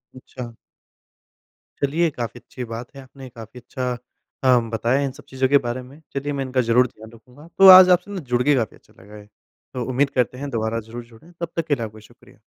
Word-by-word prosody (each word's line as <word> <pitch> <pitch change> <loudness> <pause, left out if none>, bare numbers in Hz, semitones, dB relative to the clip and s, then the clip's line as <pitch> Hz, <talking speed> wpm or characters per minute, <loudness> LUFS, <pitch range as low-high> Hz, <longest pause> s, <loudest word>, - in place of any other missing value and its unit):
अच्छा। 125 -2 -10 1.3
चलिए, 160 +4 +1
काफ़ी 120 -3 -6
अच्छी 125 - -9
बात 115 +4 -8
है। 135 - -9
आपने 130 0 -13
काफ़ी 115 +1 -12
अच्छा 125 0 -4 0.5
काम 125 -3 +3
बताया 120 +4 +1
इन 135 - -3
सब - - -15
चीज़ों 130 0 0
के 140 - +6
बारे 125 +2 -3
में। 135 +5 -15
चलिए, 140 +1 -3
मैं 135 -1 -2
इनका 130 0 0
ज़रूर 120 +2 +3
ध्यान 110 0 -15
रखूँगा। 125 +7 -17
तो 195 0 +8
आज 185 0 +11
आपसे 180 +3 +2
ना, 195 - -4
जुड़ 125 -4 -1
के 145 -1 +3
काफ़ी 115 -6 -2
अच्छा - - -27
लगा 105 +2 -14
है। 105 -1 -13 0.5
तो 125 -1 -3
उम्मीद 135 +2 +1
करते 125 -2 -1
हैं, 140 +1 -5
दोबारा 115 -1 -2
ज़रूर 115 +2 -9
जुड़ें। 120 +9 -18
तब 170 0 -6
तक 165 - -1
के 145 - +2
लिए 115 - -5
आपका 110 0 -11
शुक्रिया। 110 - -20
125 Hz, 220 wpm, -22 LUFS, 115-140 Hz, 1.3 s, आज